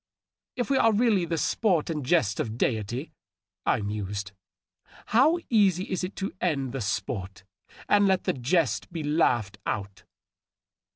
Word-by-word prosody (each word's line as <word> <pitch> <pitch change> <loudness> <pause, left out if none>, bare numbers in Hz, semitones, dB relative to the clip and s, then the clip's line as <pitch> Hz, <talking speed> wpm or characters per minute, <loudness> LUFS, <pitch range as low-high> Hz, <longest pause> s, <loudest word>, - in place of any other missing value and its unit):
" - - -67
If 245 +2 -1
we 270 - +4
are 225 - +5
really 210 -4 +2
the 165 0 -2
sport 175 -2 +1
and 150 -3 -3
jest 125 - +2
of 110 0 -3
deity,^' 120 +5 -1 0.6
I 115 - +2
mused, 100 -1 -4 0.4
" - - -25
how 285 +9 +5
easy 195 -6 +3
is 185 - -1
it 180 - -4
to 195 0 -4
end 140 -7 0
the 135 0 -4
sport 100 -2 -3 0.4
and 205 -1 +4
let 190 -1 +2
the - - 0
jest 135 - 0
be 165 -2 -4
laughed 120 - +1
out 100 -2 -4
150 Hz, 160 wpm, -27 LUFS, -, 0.6 s, are